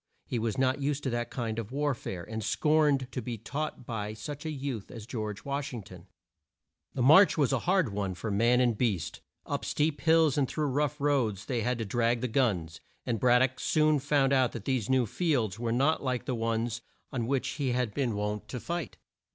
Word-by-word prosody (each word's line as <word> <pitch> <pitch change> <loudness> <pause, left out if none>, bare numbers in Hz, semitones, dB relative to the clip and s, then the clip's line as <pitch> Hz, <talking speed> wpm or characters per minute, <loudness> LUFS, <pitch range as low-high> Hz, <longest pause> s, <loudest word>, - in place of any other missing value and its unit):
He 120 - -2
was 115 +2 -1
not 130 +2 +1
used 145 +1 -1
to 130 - -1
that 120 0 -2
kind 115 -3 -3
of 115 0 -6
war 145 +1 0
fare, 95 -7 -6
and 110 0 -4
scorned 150 -3 +2
to 130 - -3
be 120 0 -4
taught 140 +3 -4
by 110 -3 -4
such 145 +7 -6
a - - -1
youth 135 -8 -4
as 115 -3 -9
George 110 -4 -5
Wash 140 0 -2
ing 115 - -6
ton. 90 -1 -13 0.9
The 130 - 0
march 160 +7 +7
was 140 -3 +2
a 135 - +2
hard 185 - +2
one 100 -2 -2
for 105 +5 -4
man 120 +5 +3
and 120 -3 +3
beast. 100 - -1 0.2
Up - - -3
steep 150 -2 0
hills 160 -3 +4
and 135 - +2
through 155 +3 -2
rough 150 +2 0
roads 125 -9 +1
they 120 -3 -1
had 125 +2 0
to 115 - -3
drag 115 +2 +1
the 125 - 0
guns, 100 - 0 0.2
and 115 -3 -1
Brad 125 +1 +5
dock 130 0 -1
soon 155 0 +3
found 140 -1 +2
out 130 -2 +3
that 115 -4 -7
these 130 -5 0
new 130 -2 +3
fields 115 - 0
were 115 -1 -1
not 140 +7 +2
like 125 -2 -1
the - - -2
old 120 -3 -3
ones 115 0 -1 0.3
on 120 -4 -2
which 135 0 0
he 135 -3 -1
had 125 -4 -1
been 125 -6 -1
wont 105 0 -3
to 125 - -5
fight. 170 +9 -4
125 Hz, 220 wpm, -29 LUFS, 110-140 Hz, 0.9 s, march